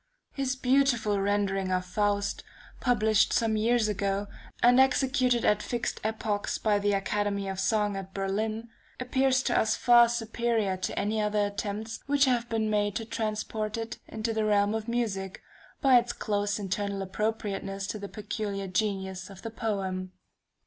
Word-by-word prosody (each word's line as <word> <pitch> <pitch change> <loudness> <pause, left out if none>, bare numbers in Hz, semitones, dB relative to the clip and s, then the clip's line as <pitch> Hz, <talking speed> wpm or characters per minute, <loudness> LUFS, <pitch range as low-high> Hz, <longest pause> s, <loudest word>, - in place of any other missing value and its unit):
His 270 -1 -1
beautiful 255 -5 +2
rendering 195 -1 0
of 185 0 0
Faust, 205 +2 0 0.4
published 220 -4 +3
some 225 -2 +2
years 225 +1 +2
ago, 200 -1 -1 0.4
and 245 +2 +6
executed 255 -2 +3
at 210 0 +3
fixed 240 +1 -3
epochs 215 -1 -1
by 210 -2 +2
the 205 0 +1
Academy 200 0 -1
of 190 -1 -4
Song 210 -2 +1
at 190 -1 -6
Berlin, 215 +4 -2 0.3
appears 260 +1 +2
to - - 0
us 220 - +3
far 240 -1 +6
superior 230 -3 0
to 185 0 -4
any 215 +1 0
other 210 0 +1
attempts 205 +2 -4
which 285 0 +4
have 240 -2 +1
been 220 -1 0
made 205 -1 0
to 225 - -2
transport 215 -1 -3
it 225 0 -5
into 225 +1 -3
the 220 0 0
realm 205 0 +2
of 220 0 -3
music, 205 -6 -2 0.4
by 265 -3 +7
its 240 0 -4
close 205 -1 -1
internal 200 0 -2
appropriateness 195 -1 -3
to 210 +2 -4
the 200 0 -7
peculiar 205 -2 -4
genius 190 -1 -2
of 195 -2 -12
the 225 - -5
poem. 190 -5 -3
215 Hz, 155 wpm, -28 LUFS, 200-230 Hz, 0.4 s, by